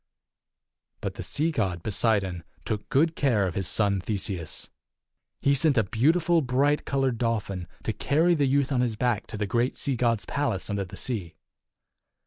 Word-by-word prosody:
But - - -4
the - - -7
sea 160 +3 -1
god, 95 - -1
Poseidon, 100 -5 +1 0.2
took 105 -1 -3
good 160 +4 +3
care 115 -8 +2
of 90 - -2
his 95 -1 -2
son 100 +4 +1
Theseus. 95 -5 -3 0.7
He 140 - +3
sent 140 0 +3
a 110 - +5
beautiful, 160 - +2
bright 140 +3 +1
colored 135 -4 0
dolphin 105 -6 -1 0.2
to 110 - -1
carry 160 +10 +2
the 145 -4 +2
youth 140 +1 +2
on 125 -2 +2
his 120 -3 0
back 120 -1 0
to 110 - -6
the 105 - -1
great 120 +5 0
sea 140 - -1
god's 115 -2 +1
palace 115 -9 -2
under 100 -1 -1
the 90 - -10
sea. 100 -10 -3
115 Hz, 170 wpm, -27 LUFS, 100-140 Hz, 0.7 s, a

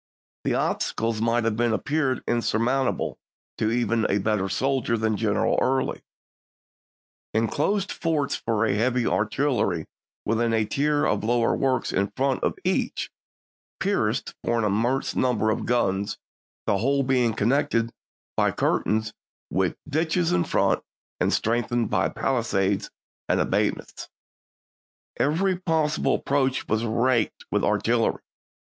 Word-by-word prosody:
The - - +1
obstacles 115 -1 -1
might 115 +1 +2
have 110 0 -1
appeared 130 +4 0
insurmountable 120 +3 0 0.4
to 110 - +2
even 115 -1 +1
a 100 - +2
better 100 -1 0
soldier 130 +2 0
than 110 -1 0
General 105 -1 +1
Early: 130 +1 0 1.3
"In 110 +1 +3
closed 195 - 0
forts 155 -5 0
for 115 -1 0
heavy 120 +4 +1
artillery 110 - 0 0.4
with 115 +1 +1
a 115 -2 +2
tier 145 +6 +1
of 105 - 0
lower 115 +1 +2
works 130 -1 0
in 100 +1 +1
front 135 0 0
of - - 0
each, - - -1 0.7
pierced - - 0
for 120 - +1
an 115 - +1
immense 115 +6 0
number 115 -4 +2
of - - -2
guns, 100 -5 0 0.5
the 100 - +1
whole 140 +5 +2
being 125 -4 +2
connected 115 0 +1 0.4
by - - +2
"Memoir - - 0
curtains, 110 0 0 0.4
with 95 -1 0
ditches 160 +3 +1
in 90 -1 +2
front, - - +1 0.4
and - - +2
strengthened 120 0 0
La°8tYear - - +2
hy - - -5
palisades 100 -6 0 0.4
and - - +2
abatis... - - -1 1.1
Every 180 +6 +1
possible 160 -4 +1
ap - - -6
War,"p?6i. 140 -2 +4
proach 130 - -5
was 110 +2 +1
raked 120 - +1
with - - +1
artillery." - - +1
120 Hz, 135 wpm, -25 LUFS, 110-135 Hz, 1.3 s, War,"p?6i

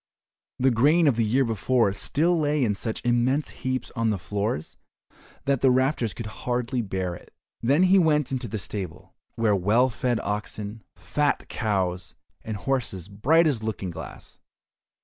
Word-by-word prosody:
The 130 +1 +3
grain 150 +8 +4
of 135 - +4
the 115 - +2
year 125 +5 +2
before 115 -1 +1
still 165 - +1
lay 150 -2 +1
in 105 -4 +2
such 110 +3 -4
immense 120 +5 +2
heaps 130 -1 -2
on 115 -2 +1
the 105 - 0
floors 100 -3 -3 0.7
that 140 -2 +1
the 135 - +5
rafters 130 -3 +1
could 115 - -6
hardly 120 +3 -2
bear 95 -4 -3
it. 85 - -12 0.3
Then 140 +9 +3
he 190 +1 +6
went 150 -5 +2
into 130 -2 -2
the 110 +1 -4
stable, 95 -3 -6 0.2
where 110 -3 +2
were 95 - -2
well 115 +7 +3
fed 120 0 0
oxen, 105 +1 -4
fat 145 -1 -1
cows, 95 -5 -2 0.3
and 110 -2 -4
horses 100 -7 -2
bright 145 +12 +3
as 140 -8 +1
looking 105 -4 -3
glass. - - -10
120 Hz, 165 wpm, -25 LUFS, 105-135 Hz, 0.7 s, he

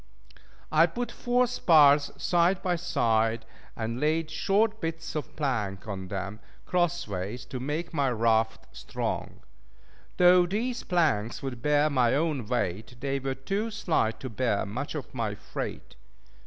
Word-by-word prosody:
I 160 +2 +6
put 240 +8 -4
four 245 +1 +1
spars 150 -11 +5
side 175 +2 +2
by 180 -1 +1
side, 115 -9 +1 0.3
and 115 +1 -3
laid 155 +2 0
short 210 +7 +1
bits 165 0 -4
of 150 - -5
plank 115 -11 -2
on 95 -2 -5
them, 100 +2 -5 0.3
cross 175 -3 0
ways, 100 +5 -4
to 130 - -6
make 150 +7 -3
my 140 -4 +1
raft 110 -1 +1
strong. - - -4 0.8
Though 180 0 +6
these 235 +6 -2
planks 140 - 0
would 125 -4 -5
bear 150 +2 +3
my 125 -3 +3
own 145 -6 0
weight, 110 -1 -2
they 140 +1 -1
were 135 0 -3
too 195 +12 -2
slight 165 - 0
to 130 - -5
bear 115 -2 0
much 125 +10 -5
of 145 - -6
my 115 -5 -2
freight. 105 - -6
140 Hz, 145 wpm, -28 LUFS, 115-175 Hz, 0.8 s, I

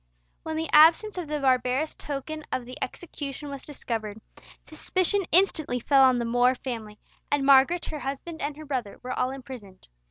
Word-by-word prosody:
When 320 0 -5
the 320 +1 -2
absence 335 +7 +6
of 340 - -5
the 300 0 -2
barbarous 260 +2 +1
token 300 +2 -6
of 250 - -2
the 250 +1 -9
execution 285 -1 -7
was 275 -1 -7
discovered, 220 -7 -5 0.5
suspicion 370 +4 0
instantly 315 -8 +3
fell 270 +3 +4
on 260 -2 +5
the 235 - -1
More 245 +2 +3
family, 225 -5 -6 0.3
and 290 -1 +1
Margaret, 275 +6 +5
her 305 - -5
husband, 280 +5 -6
and 290 0 -3
her 310 - -9
brother, 255 -8 -4
were 255 0 -4
all 250 0 0
imprisoned. 250 - -10
275 Hz, 170 wpm, -26 LUFS, 250-310 Hz, 0.5 s, absence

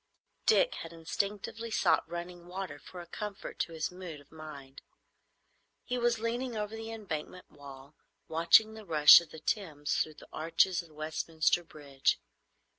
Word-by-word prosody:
Dick - - +5
had 165 - -8
instinctively 200 +7 -3
sought 195 - +2
running 175 0 -7
water 180 -5 -6
for 180 +3 -10
a - - -10
comfort 205 +3 -7
to - - -1
his 160 +1 -2
mood 180 -4 -8
of 145 - -20
mind. 145 -4 -10 1.0
He 250 -1 -2
was 240 -1 +2
leaning 235 +1 -2
over 210 +1 -3
the 225 0 -6
Embankment 180 -5 -6
wall, 140 0 -12 0.3
watching 170 +7 +5
the 220 0 -10
rush 155 -3 +9
of 170 - -12
the 160 - -10
Thames 150 -5 -2
through 155 - -1
the - - -14
arches 165 +3 +2
of 170 - -17
Westminster 155 +2 0
Bridge. 145 -4 -1
170 Hz, 155 wpm, -31 LUFS, 155-210 Hz, 1.0 s, rush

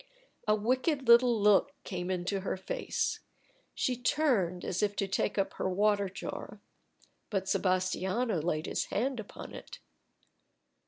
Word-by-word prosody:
A 215 - +5
wicked 260 +5 0
little 235 -1 +6
look 210 +7 +4
came 180 -1 -4
into 185 +2 -1
her 190 0 -3
face. 190 - -2 0.6
She 255 - 0
turned 240 - +1
as 185 - -1
if 205 -1 +1
to 200 - -1
take 195 - -1
up 195 - 0
her - - -2
water 200 +1 +2
jar. 190 - -7 0.7
But 195 -3 -1
Sebastiano 185 +2 0
laid 155 0 -1
his - - -1
hand 250 +3 -1
upon 215 - -9
it. - - -9
200 Hz, 140 wpm, -31 LUFS, 185-235 Hz, 0.7 s, little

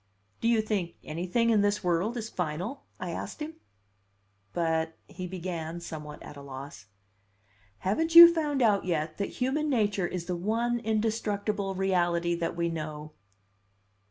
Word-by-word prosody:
"Do - - 0
you 230 -2 +3
think 195 -6 -2
anything 180 +9 0
in 215 -2 +4
this 205 0 +1
world 180 +7 +1
is 220 -2 -3
final?" 180 - -4
I - - -4
asked - - -6
him. 315 +1 -6 0.9
"But 160 -1 0
" - - -41
he 185 - -6
began, 175 -2 -4
somewhat 150 -3 -8
at - - -10
a 140 - -10
loss. 135 -5 -9 0.9
"Haven't 320 - -1
you 340 0 +12
found 295 -5 0
out 205 -3 +3
yet 160 -2 -2
that 200 - -1
human 285 +4 0
nature 205 -7 +1
is 175 -1 -4
the 180 - -2
one 230 +6 0
indestructible 210 -3 -1
reality 175 -2 +1
that 170 0 -2
we 170 0 0
know?" 155 -2 -5
185 Hz, 155 wpm, -29 LUFS, 165-225 Hz, 0.9 s, you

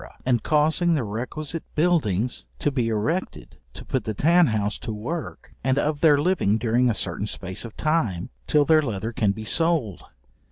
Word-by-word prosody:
and 125 -3 +2
causing 160 +4 +2
the 140 - 0
requisite 130 +9 -4
buildings 125 - +1
to 145 - 0
be 125 -4 0
erected 110 - -3
to - - -10
put - - -1
the 110 - -4
tan 170 - +4
house 105 -2 -1
to 115 - -5
work, 120 +11 -6
and 130 0 +1
of 145 0 0
their 150 -3 +6
living 145 - +2
during 120 +2 +2
a - - +2
certain 100 +2 -3
space 95 -2 -5
of 115 - -10
time, 130 - -1 0.2
till 145 -1 +3
their 160 0 +5
leather 115 -4 -3
can 105 -3 +1
be 110 +2 -7
sold. 145 - +1
125 Hz, 175 wpm, -24 LUFS, 105-155 Hz, 0.2 s, their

